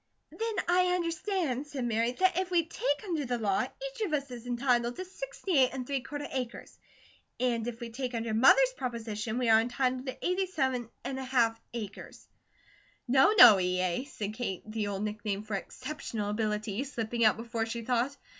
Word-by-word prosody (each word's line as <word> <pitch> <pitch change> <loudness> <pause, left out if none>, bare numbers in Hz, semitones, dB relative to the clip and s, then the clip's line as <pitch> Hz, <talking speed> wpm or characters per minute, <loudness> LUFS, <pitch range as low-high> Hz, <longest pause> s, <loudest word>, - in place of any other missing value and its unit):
"Then 445 -3 -2
I 360 +1 +3
understand," 335 - -1
said 275 -4 -4
Mary, 230 +1 +1
"that 370 +5 +2
if 370 -1 -2
we 345 -3 +2
take 290 -3 -1
under 335 -7 -2
the 245 -2 -1
law, 200 -4 +1
each - - -6
of 390 -8 -1
us 280 -3 -1
is 245 0 -8
entitled 245 -1 +1
to 370 - -5
sixty 385 - -2
eight 255 -1 +5
and 260 -2 -4
three 275 0 -1
quarter 290 +2 -6
acres; 250 -3 -5 0.6
and 240 -2 0
if 235 -1 -5
we 235 -1 -6
take 250 0 -4
under 225 -1 -2
Mother's - - +6
proposition 230 - -4
we 250 -1 0
are 220 0 +7
entitled 255 +2 -1
to 260 - -5
eighty 370 +1 +1
seven 260 -9 -1
and 265 -1 -4
a - - -4
half 235 -3 +1
acres." 210 -4 -8 0.8
"No, 270 - +5
no, 220 - +10
E. 180 0 0
A.," 185 +7 0
said 215 -7 -5
Kate, 220 -5 -4
the 215 -1 -3
old 200 0 -3
nickname 210 -1 -3
for 215 0 -7
"Exceptional 225 -1 -4
Ability" 210 +1 -1
slipping 235 -4 -2
out 215 -1 +5
before 230 0 -3
she 230 +1 -4
thought. 250 +4 0
245 Hz, 190 wpm, -30 LUFS, 225-290 Hz, 0.8 s, no